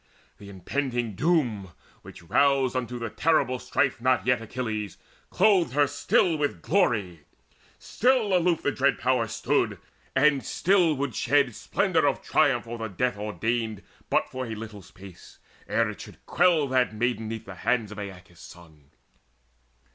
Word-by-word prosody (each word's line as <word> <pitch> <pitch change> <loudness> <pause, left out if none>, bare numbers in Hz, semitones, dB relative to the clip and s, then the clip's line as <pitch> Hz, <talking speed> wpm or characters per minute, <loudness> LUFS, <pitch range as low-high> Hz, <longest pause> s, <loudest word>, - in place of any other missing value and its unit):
The 100 - -11
impending 120 +4 -3
Doom, 115 - 0 0.3
Which - - -13
roused 135 +7 +2
unto 125 -1 -3
the 115 -2 -5
terrible 155 -6 +1
strife 130 0 -1
not 130 0 +2
yet 125 -2 +2
Achilles, 110 -3 -4 0.3
clothed 185 - +3
her 145 +1 +4
still 160 +3 +1
with 145 -1 -2
glory; 105 - 0 0.5
still 240 -5 +1
Aloof 175 -2 +1
the 145 - +1
dread 140 0 +1
Power 125 -2 +1
stood, - - 0 0.4
and 140 0 +3
still 180 -4 +2
would 140 -2 -3
shed 140 +1 +2
Splendour - - 0
of - - -1
triumph - - +2
o'er 120 0 -7
the 110 - -3
death 125 +4 -1
ordained 110 0 -3 0.3
But - - +1
for 130 -1 -5
a 110 - -5
little 105 -2 -9
space, 95 -1 -15 0.3
ere 115 -1 +1
it 100 - -11
should - - -13
quell 170 -4 +3
That 130 -4 +1
Maiden 115 0 -1
'neath 110 0 -6
the 100 - -9
hands 110 +2 -1
of 105 - -8
Aeaeus' 90 -4 -10
son. 80 -5 -15
120 Hz, 155 wpm, -26 LUFS, 105-140 Hz, 0.5 s, her